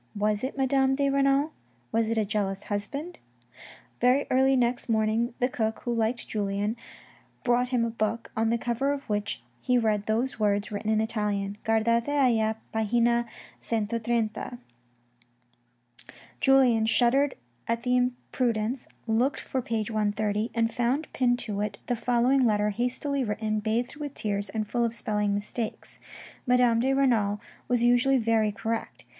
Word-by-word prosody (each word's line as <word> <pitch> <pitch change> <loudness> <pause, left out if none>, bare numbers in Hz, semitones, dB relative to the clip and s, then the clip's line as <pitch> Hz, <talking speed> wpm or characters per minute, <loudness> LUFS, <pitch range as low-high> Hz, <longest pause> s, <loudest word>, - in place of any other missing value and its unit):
Was 210 +1 0
it 265 +2 -3
Madame 270 0 +2
de 280 0 +1
Renal? 275 +2 +2 0.4
Was 225 0 +1
it 230 - 0
a 215 - +2
jealous 195 -2 -2
husband? 280 +12 -4 0.8
Very 255 +3 +3
early 265 +1 +4
next 245 -1 0
morning 225 +2 +1
the 250 - +2
cook, 220 -3 -2
who 240 - -1
liked 230 +1 -1
Julien, 205 +1 -1 0.7
brought 245 0 +2
him 245 -2 +1
a 230 - -2
book, 225 +1 -2
on 225 0 +1
the 235 - +2
cover 245 +4 0
of 280 -1 -5
which 205 - -2 0.2
he 250 - +2
read 215 -3 +1
these 230 +3 0
words 205 -1 +1
written 210 +1 -3
in 220 0 +3
Italian: 205 -2 -2
Guardate 230 +1 +2
alia 230 -6 +2 0.2
pagina 235 +2 +2 0.4
130. 230 +1 -1 1.8
Julien 250 -5 +4
shuddered 260 +5 +3 0.3
at 230 0 -1
the 250 0 +2
imprudence, 245 -1 -1 0.2
looked 235 +5 +1
for 260 - -3
page 225 -2 -2
130, 210 0 0
and 230 0 +1
found 255 +6 -1
pinned 245 -2 +2
to 205 -4 -4
it 205 -1 -3
the 245 - 0
following 245 +3 +2
letter 210 -2 +2
hastily 255 +5 -1
written, 215 -1 -1
bathed 235 +5 -1
with 290 -2 -6
tears, 205 -1 -2
and 215 +1 -3
full 240 +3 0
of 230 0 -1
spelling 210 -3 -1
mistakes. 215 +2 -5 0.5
Madame 250 -2 +4
de 260 +3 +2
Renal 230 -7 +2 0.3
was 245 -1 +1
usually 245 +3 +4
very 225 -2 +2
correct. 225 +2 -4
230 Hz, 150 wpm, -27 LUFS, 215-250 Hz, 1.8 s, early